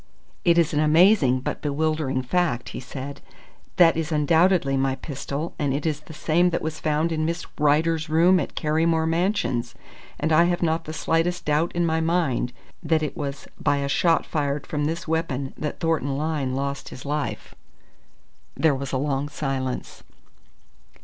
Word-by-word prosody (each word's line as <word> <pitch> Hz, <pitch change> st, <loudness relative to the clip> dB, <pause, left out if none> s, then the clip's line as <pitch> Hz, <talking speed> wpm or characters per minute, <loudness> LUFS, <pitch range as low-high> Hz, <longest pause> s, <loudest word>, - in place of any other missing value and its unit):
"It 170 Hz, 0 st, +4 dB
is 165 Hz, -3 st, +3 dB
an 145 Hz, -, +1 dB
amazing 155 Hz, -, +4 dB
but -, -, -4 dB
bewildering 150 Hz, -3 st, -1 dB
fact," 135 Hz, -4 st, 0 dB
he -, -, -6 dB
said. 135 Hz, +2 st, -7 dB, 0.5 s
"That 170 Hz, -2 st, +6 dB
is 160 Hz, 0 st, -2 dB
undoubtedly 160 Hz, 0 st, +3 dB
my 135 Hz, 0 st, +1 dB
pistol, 140 Hz, +3 st, -5 dB
and 140 Hz, -2 st, 0 dB
it 145 Hz, -, -3 dB
is 155 Hz, -3 st, 0 dB
the 155 Hz, +1 st, -13 dB
same 170 Hz, +3 st, +2 dB
that 170 Hz, -, -2 dB
was 160 Hz, 0 st, -4 dB
found 155 Hz, +2 st, 0 dB
in 155 Hz, -1 st, -1 dB
Miss 170 Hz, +2 st, -2 dB
Rider's 155 Hz, +2 st, +2 dB
room 175 Hz, +4 st, +5 dB
at 145 Hz, -, -4 dB
Carrymore 160 Hz, +1 st, +1 dB
Mansions, 165 Hz, -, 0 dB, 0.4 s
and 155 Hz, +2 st, 0 dB
I 170 Hz, +2 st, +6 dB
have 175 Hz, 0 st, 0 dB
not 165 Hz, 0 st, 0 dB
the 155 Hz, -, -6 dB
slightest 165 Hz, +3 st, 0 dB
doubt 150 Hz, +3 st, +1 dB
in 175 Hz, 0 st, +2 dB
my 160 Hz, 0 st, +1 dB
mind 160 Hz, -7 st, 0 dB, 0.3 s
that 160 Hz, -2 st, +1 dB
it 150 Hz, -, -3 dB
was 140 Hz, -4 st, -5 dB
by 145 Hz, -, +1 dB
a 140 Hz, 0 st, -1 dB
shot 165 Hz, +4 st, +2 dB
fired 145 Hz, -2 st, -2 dB
from 150 Hz, -1 st, -2 dB
this 165 Hz, +3 st, -3 dB
weapon 155 Hz, -5 st, -2 dB
that 150 Hz, -, -4 dB
Thornton 155 Hz, -5 st, 0 dB
Lyne 145 Hz, -4 st, -1 dB
lost 140 Hz, +1 st, -3 dB
his 130 Hz, -, -10 dB
life." 150 Hz, +1 st, -3 dB, 1.0 s
There 160 Hz, -3 st, +3 dB
was 135 Hz, -1 st, -4 dB
a 130 Hz, -, 0 dB
long 140 Hz, +1 st, -1 dB
silence. 135 Hz, -3 st, -4 dB
155 Hz, 170 wpm, -24 LUFS, 140-165 Hz, 1.0 s, That